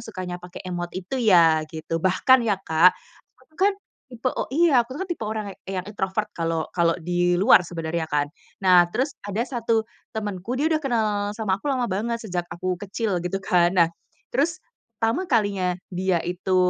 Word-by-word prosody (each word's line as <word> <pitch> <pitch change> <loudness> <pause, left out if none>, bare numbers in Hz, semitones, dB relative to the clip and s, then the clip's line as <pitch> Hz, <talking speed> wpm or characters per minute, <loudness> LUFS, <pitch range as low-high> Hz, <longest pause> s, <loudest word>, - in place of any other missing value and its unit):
sukanya 180 -1 -6
pake 180 +1 -10
emot 175 -1 -3
itu 190 +8 -3
ya?" 170 -8 +5
gitu. 160 +1 -4
Bahkan 190 +9 +4
ya 200 - +2
Kak, 170 +3 +5 0.5
aku 310 - -39
kan 405 +1 +5 0.4
tipe 250 0 -3 0.2
iya, 320 -7 +5
aku 250 +3 -5
kan 380 - -3
tipe 345 -7 -5
orang 215 -2 -4 0.2
yang 185 -1 -3
introvert 205 0 -3
kalau 165 -1 -1
kalau 170 -1 +2
di 175 +1 +1
luar 190 0 +6
sebenarnya 165 -1 -4
kan, 145 -1 +1 0.3
nah 180 -2 +5
terus 265 +10 -1
ada 205 +3 -2
1 230 -3 0 0.3
temanku, 210 +3 -3
dia 285 - 0
udah 310 - +1
kenal 240 -7 +1 0.3
sama 205 -2 -1
aku 295 - -4
lama 260 -3 +1
banget, 230 +3 -1
sejak 175 -3 -3
aku 180 0 -3
kecil 200 -2 -2
gitu 180 +2 -2
kan. 175 +1 +3
Nah 170 -1 +4 0.4
terus 330 +8 0 0.3
pertama 230 - 0
kalinya, 195 -4 +1 0.2
dia 180 -2 0
itu 180 +1 -1
190 Hz, 175 wpm, -24 LUFS, 175-230 Hz, 0.5 s, luar